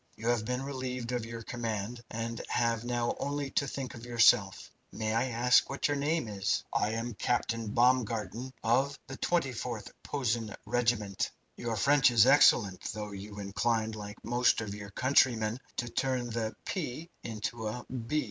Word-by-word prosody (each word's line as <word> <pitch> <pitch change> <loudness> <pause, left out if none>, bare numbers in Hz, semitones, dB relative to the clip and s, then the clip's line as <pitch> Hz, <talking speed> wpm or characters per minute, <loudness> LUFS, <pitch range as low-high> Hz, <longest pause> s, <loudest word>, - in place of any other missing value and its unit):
You 115 +2 -2
have 120 -3 +1
been 125 +2 -2
relieved 130 -3 -4
of 120 -2 -2
your 115 0 -7
command, 115 0 -3
and 115 +1 -4
have 115 -1 +1
now 120 -1 0
only 140 -1 -2
to 140 - +1
think 130 -1 -5
of 115 - -10
yourself. 115 -4 +3 0.2
May 110 0 -2
I 115 +3 +2
ask 125 +1 +4
what 135 - 0
your 145 - 0
name 145 -1 0
is?" 100 -1 0
"I 105 +1 +1
am 115 +1 -3
Captain 115 0 -1
Baumgarten 120 +1 +1
of, 135 +5 +2
the 135 - -8
24th 125 -9 -1
Posen 120 -6 -1
Regiment." 115 -5 0 0.3
"Your 115 -1 -3
French 140 +7 +5
is 115 -2 +6
excellent, 110 -8 +5
though 105 0 -5
you 100 +1 -8
incline, 110 +3 0
like 105 -1 -8
most 120 +1 +3
of 105 -3 -4
your 105 0 -7
countrymen, 115 -1 +2 0.2
to 120 - -1
turn 125 0 -1
the 110 -1 -2
'p' 160 -3 -3 0.2
into 110 0 -4
a 120 +3 -5
'b.' 125 +4 -2
120 Hz, 165 wpm, -31 LUFS, 110-125 Hz, 0.3 s, is